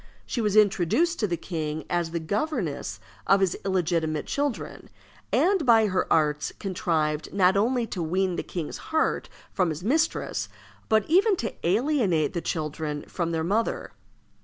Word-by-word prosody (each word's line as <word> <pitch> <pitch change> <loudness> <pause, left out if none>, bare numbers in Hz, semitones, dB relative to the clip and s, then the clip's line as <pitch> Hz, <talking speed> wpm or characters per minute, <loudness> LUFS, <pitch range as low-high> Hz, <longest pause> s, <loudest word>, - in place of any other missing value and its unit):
She 240 - -2
was 210 -2 0
introduced 215 - +3
to 210 - +1
the 175 -2 -1
king 155 -2 -4
as 175 -2 0
the 170 +1 -2
governess 170 - -2 0.3
of 195 - +5
his 190 -2 +1
illegitimate 170 -5 0
children, 285 -4 -3 0.4
and 380 -2 +3
by 230 -4 +5
her 185 -3 -1
arts 150 -2 +2
contrived 165 -6 -1
not 190 -1 +3
only 235 +4 +2
to 190 -5 -5
wean 180 +3 0
the - - -2
king's 170 -4 -5
heart 320 0 0 0.2
from 185 -3 +1
his 155 +2 -5
mistress, 310 +9 0 0.4
but 220 -2 +3
even 385 +6 +4
to 230 - -3
alienate 200 - +2
the 170 - -2
children 150 -2 -3
from 170 -2 -2
their 165 -1 -1
mother. 210 +7 -1
185 Hz, 155 wpm, -26 LUFS, 160-225 Hz, 0.4 s, of